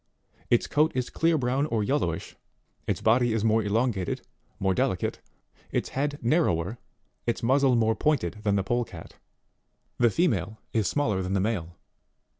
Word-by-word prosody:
Its 120 - +3
coat 155 +2 +2
is 125 -1 -2
clear 165 0 +2
brown 135 +2 0
or 110 -5 0
yellowish; 100 - -1 0.5
its - - -1
body 120 +1 +3
is 110 -2 0
more 110 0 +3
elongated, 105 -2 -1 0.3
more 95 -1 +2
delicate, 125 -6 -1 0.5
its - - -1
head 145 +2 -2
narrower, 115 - +1 0.5
its 120 - -1
muzzle 135 +1 +4
more 110 -1 +2
pointed 110 - 0
than 100 -2 +1
the 100 - +1
polecat; 100 -5 -3 0.8
the 120 -1 +5
female 110 - 0 0.2
is 110 -3 +1
smaller 110 -10 0
than 95 +1 -2
the 100 - +2
male. 95 -5 -2
115 Hz, 150 wpm, -27 LUFS, 100-130 Hz, 0.8 s, the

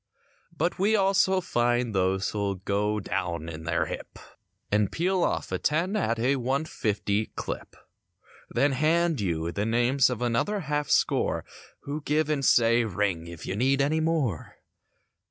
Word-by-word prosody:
But, 170 +4 -1
we 210 +3 +3
also 190 -1 +3
find 120 -6 0
those 95 0 +1
who'll 100 -2 -1
go 105 +3 -1
"down 90 -5 -3
in 80 -1 -7
their 85 0 0
hip" - - -7 0.5
And 105 -1 +2
peal 185 +2 0
off - - -1
a - - -1
ten 170 +7 0
at 115 - 0
a 130 +4 +1
one 135 +4 -1
fifty 105 -4 -1
clip - - -6 0.7
Then 140 +4 +2
hand 160 +1 +2
you 85 -3 -1
the 100 - -2
names 120 +4 +3
of 125 -1 -3
another 120 - 0
half 150 -1 -2
score - - +1 0.4
Who 145 +2 -5
give 150 +1 0
and 140 -2 0
say 120 -1 +4
"Ring 95 -5 -1
if 85 -1 -9
you 95 - -3
need 135 +5 +2
anymore." 150 - 0
120 Hz, 155 wpm, -27 LUFS, 100-155 Hz, 0.7 s, say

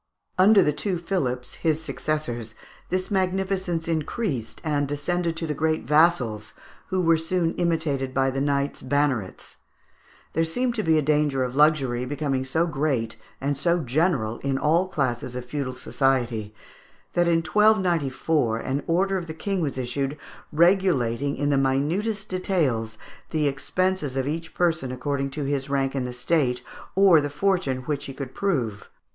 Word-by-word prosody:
Under 200 +2 +7
the 150 - +2
two 185 +4 -1
Philips, 140 -9 -2
his 160 -1 +2
successors, 120 -9 -3 0.3
this 185 +3 -2
magnificence 190 -3 0
increased, 155 - -2
and 145 -2 0
descended 165 +4 -1
to 165 - -1
the 150 - -2
great 155 -3 0
vassals, 135 -8 +2 0.3
who 190 -1 -1
were 165 -1 +4
soon 165 0 0
imitated 160 -6 0
by 135 0 +1
the 135 +1 -2
knights 140 0 0
"bannerets." 130 -7 -1 0.8
There 165 - +2
seemed 245 +10 0
to 225 - -1
be 160 -4 +3
a 155 - +2
danger 150 -2 +2
of 125 0 -4
luxury 140 -5 +3
becoming 135 -1 -2
so 160 +6 +1
great, 135 -8 -1 0.2
and 140 +1 -1
so 170 +5 +2
general 135 -5 0
in 135 -1 -1
all 165 +6 +2
classes 125 -7 -2
of 125 -1 -5
feudal 130 -1 -3
society, 125 -6 0 0.6
that 175 0 +2
in 165 -1 +3
1294 165 - +2
an 135 +4 -2
order 190 +3 +2
of 170 - -8
the 160 - -6
King 195 +2 -2
was 140 -4 -2
issued, 135 +3 -2 0.3
regulating 150 -7 +2
in 145 +1 0
the 140 - +3
minutest 175 +11 0
details 140 - -1 0.3
the 155 -2 +1
expenses 150 +1 -1
of 135 0 0
each 165 +3 -4
person 160 -7 +1
according 135 +2 -2
to 145 +2 -4
his 140 0 -2
rank 135 -1 0
in 135 -2 -1
the 125 - -4
State, 125 -1 0 0.3
or 190 -5 +6
the 145 - -2
fortune 145 -4 0
which 145 +1 -3
he 135 - -7
could 135 -2 -6
prove. 125 - -2
150 Hz, 160 wpm, -25 LUFS, 130-170 Hz, 0.8 s, Under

